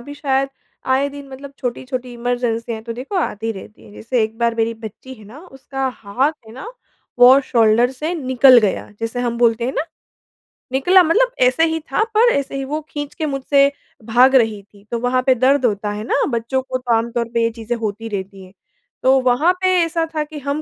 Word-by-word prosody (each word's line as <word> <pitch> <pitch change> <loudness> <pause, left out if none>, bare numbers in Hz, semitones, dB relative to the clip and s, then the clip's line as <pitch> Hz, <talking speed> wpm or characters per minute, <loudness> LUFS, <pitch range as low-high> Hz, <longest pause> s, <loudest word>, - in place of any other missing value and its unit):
भी 285 +4 -10
शायद 275 -2 0 0.5
आए 280 +2 +1
दिन 280 0 -10
मतलब 270 +1 -10
छोटी-छोटी 250 0 -5
इमरजेंसियाँ 235 -2 -3
तो 230 0 -6
देखो 260 - -6
आती 225 - -2
रहती 205 +1 -12
हैं। 205 - -15
जैसे 230 +2 -1
एक 220 +1 -3
बार 235 -1 +1
मेरी 230 0 -1
बच्ची 240 +5 -9
है 215 -4 -16
ना 225 +8 -13
उसका 270 -1 -5
हाथ 250 +9 -1
है 220 - -12
ना, 265 - -9 0.5
वो 250 +2 +8
शोल्डर 235 -2 +3
से 300 +6 -4
निकल 260 -4 +5
गया, 205 -4 -1
जैसे 230 +2 -3
हम 235 -1 -2
बोलते 235 -1 +2
हैं 260 - -2
ना 310 - 0 0.9
निकला 355 +9 +5
मतलब 475 +10 +2
ऐसे 255 +6 +2
ही 320 0 -2
था - - +2
पर 470 +3 +4
ऐसे 275 -1 -2
ही 275 - -3
वो 300 +3 -3
खींच 290 -1 -6
के 320 - -3
मुझसे 280 0 +2 0.3
भाग 250 +4 +4
रही 220 -5 +2
थी। 200 0 -22
तो 235 - -1
वहाँ 250 +1 +1
पे 260 -1 +4
दर्द 260 +2 +2
होता 210 -2 -1
है 210 +1 -5
ना, 245 - 0
बच्चों 235 +2 -1
को 260 0 -4
तो 250 -2 -1
आम 230 +1 -1
तौर 235 -1 -2
पे 230 0 +1
ये 230 - +2
चीज़ें 230 +1 -4
होती 225 0 -4
रहती 195 -1 -6
हैं। 185 - -18 0.5
तो 265 +1 +5
वहाँ 255 +7 +3
पे 370 - +2 0.2
ऐसा 330 0 -1
था 305 - 0
कि 300 0 -9
हम 285 +2 -3
250 Hz, 215 wpm, -19 LUFS, 230-275 Hz, 0.9 s, वो